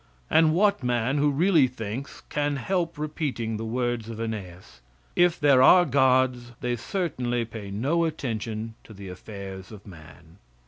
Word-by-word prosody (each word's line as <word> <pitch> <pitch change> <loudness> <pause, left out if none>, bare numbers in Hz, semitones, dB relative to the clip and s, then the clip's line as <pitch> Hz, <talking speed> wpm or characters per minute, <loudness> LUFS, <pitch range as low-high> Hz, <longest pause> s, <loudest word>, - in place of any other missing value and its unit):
And 160 0 +5
what 200 0 +3
man, 125 +2 0
who 145 +1 +3
really 155 0 +4
thinks, 120 +2 -6
can 145 -1 -2
help 170 +4 -2
repeating 145 -7 -3
the 110 - -5
words 120 -1 -2
of 115 -1 -7
Aeneas, 95 - -6 0.3
"If 175 -1 +3
there 140 -3 +5
are 180 +7 +7
gods 130 -3 +2
they 125 0 -1
certainly 120 - -2
pay 110 -3 -8
no 140 +12 0
attention 115 -7 -4
to 110 - -13
the 100 -1 -9
affairs 95 0 -9
of 105 -2 -12
man." 80 0 -15
120 Hz, 150 wpm, -26 LUFS, 110-145 Hz, 0.3 s, are